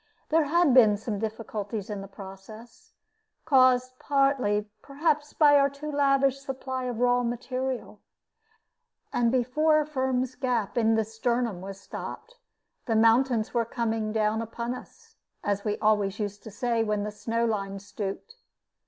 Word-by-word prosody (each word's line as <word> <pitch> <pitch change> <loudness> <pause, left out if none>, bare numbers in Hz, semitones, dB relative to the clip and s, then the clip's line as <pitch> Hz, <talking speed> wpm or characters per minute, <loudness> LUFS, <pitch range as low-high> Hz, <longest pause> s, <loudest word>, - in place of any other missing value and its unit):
There 320 -1 +3
had 325 -1 +3
been 220 -5 +6
some 215 -1 -4
difficulties 215 -2 -4
in 205 -2 -5
this 195 - -9
process, 200 +4 -12 0.5
caused 255 -3 +4
partly, 270 -7 +1
perhaps, 295 +1 -1
by 290 -2 +6
our 280 0 +4
too 290 +2 -7
lavish 275 -1 +2
supply 265 -2 -5
of 245 -2 -3
the 245 - 0
raw 245 0 +3
material; 255 +2 -4 1.1
and 235 -1 +2
before 300 +5 +2
Firm's 260 -3 -1
gap 240 -7 -1
in 225 -2 +3
his 220 0 -2
"sternum" 235 -4 -1
was 195 +1 -8
stopped, - - -8 0.5
the 225 - +1
mountains 230 +1 +3
were 235 -1 +2
coming 225 -2 -2
down 215 0 +1
upon 235 +2 -4
us, 255 - -13 0.3
as 200 -1 -1
we 210 -1 -1
always 210 -2 +1
used 205 -1 -4
to - - -7
say 230 +2 0
when 210 -2 -1
the 210 - -4
snow 230 +2 -1
line 200 -3 -2
stooped. 205 - -6
235 Hz, 150 wpm, -27 LUFS, 215-265 Hz, 1.1 s, been